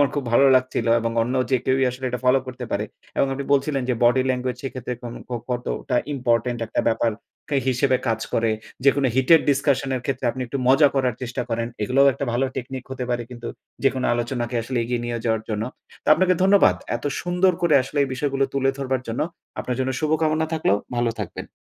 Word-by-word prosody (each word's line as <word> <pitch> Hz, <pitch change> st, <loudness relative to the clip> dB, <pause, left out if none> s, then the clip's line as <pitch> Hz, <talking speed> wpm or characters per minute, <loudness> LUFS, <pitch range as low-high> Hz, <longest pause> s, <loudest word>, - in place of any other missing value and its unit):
আমার 145 Hz, -, +5 dB
খুব 145 Hz, -3 st, -2 dB
ভালো 135 Hz, +3 st, +6 dB
লাগছিল 130 Hz, -2 st, -1 dB
এবং 115 Hz, 0 st, -1 dB
অন্য 125 Hz, +3 st, -2 dB, 0.2 s
যে 130 Hz, -, +4 dB
কেউই 130 Hz, 0 st, +2 dB
আসলে 130 Hz, +1 st, -8 dB
এটা 125 Hz, -, -2 dB
ফলো 125 Hz, +1 st, +5 dB
করতে 125 Hz, -1 st, -6 dB
পারে 105 Hz, +1 st, 0 dB, 0.3 s
এবং -, -, +3 dB
আপনি 140 Hz, +1 st, -4 dB
বলছিলেন 140 Hz, -1 st, +1 dB
যে, 125 Hz, -, +2 dB
body 125 Hz, +2 st, +4 dB
language, 125 Hz, 0 st, -2 dB
সেক্ষেত্রে 130 Hz, -2 st, -4 dB
কোন 120 Hz, -1 st, -6 dB, 0.2 s
ক 125 Hz, -, -7 dB, 0.2 s
কতটা 125 Hz, +1 st, -2 dB, 0.2 s
ইম্পোর্টেন্ট 120 Hz, -2 st, 0 dB
একটা -, -, -1 dB
ব্যাপারকে 115 Hz, +5 st, -2 dB
হিসেবে 130 Hz, +1 st, +2 dB
কাজ 110 Hz, 0 st, 0 dB
করে। 115 Hz, 0 st, +2 dB, 0.3 s
যেকোনো 140 Hz, -1 st, +4 dB
heated 130 Hz, +5 st, +5 dB
discussion 140 Hz, -1 st, +1 dB
এর -, -, -4 dB
ক্ষেত্রে, 135 Hz, -1 st, -2 dB
আপনি 130 Hz, -, -7 dB
একটু 135 Hz, +3 st, -4 dB
মজা 145 Hz, +2 st, +6 dB
করার 130 Hz, -3 st, +1 dB
চেষ্টা 125 Hz, +1 st, -3 dB
করেন। 115 Hz, 0 st, -1 dB, 0.2 s
এগুলোও 135 Hz, +5 st, +4 dB
একটা 140 Hz, -, -4 dB
ভালো 125 Hz, +3 st, +1 dB
টেকনিক 130 Hz, 0 st, -5 dB
হতে 130 Hz, -1 st, -4 dB
পারে 120 Hz, -1 st, 0 dB
কিন্তু 120 Hz, -1 st, -7 dB, 0.3 s
যেকোনো 130 Hz, -1 st, +1 dB
আলোচনাকে 120 Hz, 0 st, -2 dB
আসলে 130 Hz, +1 st, -2 dB
এগিয়ে 120 Hz, 0 st, -2 dB
নিয়ে 120 Hz, 0 st, -2 dB
যাওয়ার 110 Hz, -1 st, +1 dB
জন্য। 105 Hz, 0 st, -2 dB, 0.4 s
তো, -, -, -4 dB
আপনাকে 185 Hz, +1 st, +3 dB
ধন্যবাদ 190 Hz, -, +5 dB, 0.2 s
এত -, -, -12 dB, 0.2 s
সুন্দর 180 Hz, +1 st, +2 dB
করে 165 Hz, -4 st, +4 dB
আসলে 140 Hz, +3 st, -5 dB
এই -, -, -5 dB
বিষয়গুলো 135 Hz, 0 st, 0 dB
তুলে 135 Hz, 0 st, +2 dB
ধরবার 130 Hz, -2 st, -1 dB
জন্য। 115 Hz, -, -3 dB, 0.4 s
আপনার 125 Hz, -, -3 dB
জন্য 130 Hz, -, 0 dB
শুভকামনা 155 Hz, 0 st, +1 dB
থাকলো। 160 Hz, -11 st, +1 dB, 0.2 s
ভালো 120 Hz, -1 st, +1 dB
থাকবেন। 95 Hz, -, -6 dB
130 Hz, 200 wpm, -23 LUFS, 120-140 Hz, 0.4 s, ভালো